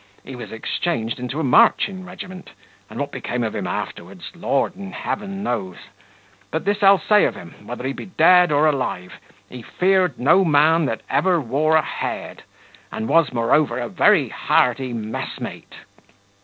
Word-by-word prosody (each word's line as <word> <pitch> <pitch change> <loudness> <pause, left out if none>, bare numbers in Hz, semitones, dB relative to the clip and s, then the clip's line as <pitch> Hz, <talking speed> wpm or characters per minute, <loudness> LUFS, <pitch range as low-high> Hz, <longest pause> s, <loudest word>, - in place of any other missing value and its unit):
He 135 - -9
was 115 -4 -9
exchanged 115 0 -3
into 125 +4 -4
a - - -1
marching 185 +8 +3
regiment, 185 0 -10 0.4
and - - -8
what - - -3
became 120 0 -4
of 110 - -3
him - - -3
afterwards, 90 +1 -6
Lord 170 0 -1
in 195 0 -9
heaven 200 -1 -5
knows; 95 - -3 0.7
but 160 - -3
this 205 0 0
I'll 195 0 +7
say 210 +5 +3
of - - -1
him, 90 +4 -13
whether 125 +1 -6
he 135 - -2
be - - -9
dead 180 -2 +5
or 145 +1 +3
alive, 130 -11 -2 0.3
he 125 - -10
feared 185 +2 +1
no 155 +9 +4
man 160 0 +3
that 115 - -3
ever 180 -2 +2
wore 150 +4 +1
a 160 - +4
head, - - -5 0.5
and 110 - -4
was, 165 +2 +3
moreover, 120 +2 +1
a 120 -2 -4
very - - +3
hearty 125 +1 +1
messmate." 110 -1 -6
145 Hz, 165 wpm, -21 LUFS, 120-180 Hz, 0.7 s, I'll